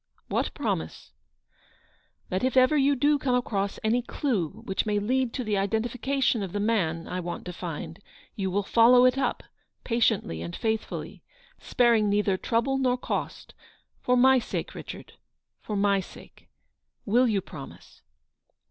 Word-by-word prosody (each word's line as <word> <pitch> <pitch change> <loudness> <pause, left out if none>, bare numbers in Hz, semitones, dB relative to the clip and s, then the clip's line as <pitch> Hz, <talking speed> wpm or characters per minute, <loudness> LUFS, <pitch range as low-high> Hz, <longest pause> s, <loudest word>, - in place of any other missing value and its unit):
" - - -42
What - - -1
promise 80 0 -4 0.4
?" - - -34
" - - -41
That 185 +4 -2
if 260 0 +1
ever 255 +4 +5
you 280 0 +3
do 290 +3 +2
come 255 -3 +1
across 200 -5 -1
any 230 +3 +2
clue 235 - -1 0.2
which 195 +2 -1
may 210 -1 +1
lead 250 +4 0
to 255 - -2
the 210 -3 0
identification 235 +4 0
of 190 -3 -5
the 205 - -1
man 180 -7 0
I 180 - -3
want 175 -1 -5
to 180 - -6
find, 165 0 -6 0.4
you 190 -2 -2
will 200 +2 0
follow 240 +4 +6
it 255 - +4
up, 270 - -1 0.4
patiently 225 - 0
and 85 +1 -6
faithfully, 220 -1 -3 0.4
sparing 230 -4 +2
neither 205 -1 +2
trouble 235 +7 0
nor 255 -1 +1
cost; - - -4 0.5
for 250 0 +2
my 260 +1 +6
sake, - - -5
Richard, - - -9 0.5
for 210 - -5
my 200 0 +2
sake. 185 - -12 0.6
Will 245 +4 +3
you 210 -4 +1
pro 145 -6 -9
mise - - -17
220 Hz, 165 wpm, -27 LUFS, 195-250 Hz, 0.6 s, follow